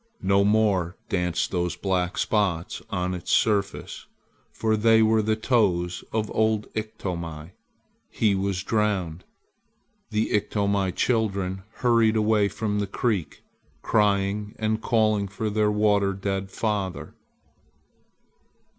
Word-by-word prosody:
No 100 +1 +3
more 100 -4 +2
danced 90 -3 -1
those 90 -1 -1
black 90 -2 -1
spots 95 -6 0
on 90 0 -2
its 90 -2 -5
surface, 100 -3 0 0.4
for 110 -1 0
they 110 +1 +4
were 110 0 +3
the 110 +1 +1
toes 95 -7 +1
of 110 -1 -2
old 110 -1 +2
Iktomi. 85 -7 -5 0.6
He 105 -3 +1
was 95 -1 -1
drowned. 100 -6 -1 0.9
The 110 0 -1
Iktomi 100 -2 0
children 100 -5 0 0.2
hurried 115 -2 +4
away 105 -1 +3
from 105 0 -2
the 100 - -1
creek, 100 -3 -2 0.4
crying 105 0 +1
and 110 0 -1
calling 110 -3 +2
for 105 +2 -3
their 105 0 +2
water 105 -2 +2
dead 95 0 -3
father. 100 -3 -3
100 Hz, 115 wpm, -25 LUFS, 95-110 Hz, 0.9 s, they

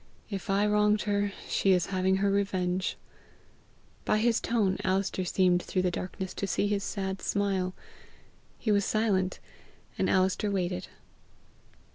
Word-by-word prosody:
If 195 0 -5
I 200 +1 +3
wronged 210 0 +3
her, 205 -1 0 0.2
she 195 - +3
is 180 -2 +2
having 190 0 +2
her 200 +1 +1
revenge!" 185 -2 0 1.1
By - - +2
his 230 +1 +2
tone 210 -5 +1
Alister 190 0 0
seemed 180 0 +2
through 185 +1 -1
the 180 - +1
darkness 185 +1 -5
to 200 - -3
see 190 - 0
his 205 -1 0
sad 190 -1 -3
smile. 190 -2 0 0.8
He 220 - -1
was 200 -1 +3
silent, 195 -3 +1 0.6
and - - +2
Alister 190 +2 +2
waited. 185 -2 -2
195 Hz, 140 wpm, -29 LUFS, 185-205 Hz, 1.1 s, I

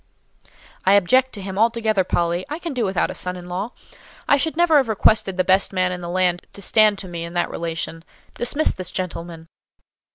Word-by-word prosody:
"I 190 - +4
object 255 +7 +4
to 200 - -7
him 190 0 -5
altogether, 220 -3 +2
Polly; 175 0 0
I 300 - -3
can 340 -3 -5
do 245 -4 0
without 190 -1 0
a - - -6
son 180 0 -2
in 175 0 -10
law. 185 +5 -3 0.6
I - - +6
should 315 +3 -2
never 340 -3 +5
have 265 -5 +2
requested 210 -2 +2
the 185 - +3
best 190 +2 +3
man 185 -1 0
in 180 0 -5
the 170 - -6
land 180 -1 0
to 200 - -10
stand 215 +1 +4
to 195 - -6
me 170 -1 -5
in 170 +1 -8
that 175 - 0
relation. 165 0 -4 0.3
Dismiss 285 +6 +1
this 185 -1 -6
gentleman." 170 -3 -5
190 Hz, 205 wpm, -21 LUFS, 175-225 Hz, 0.6 s, I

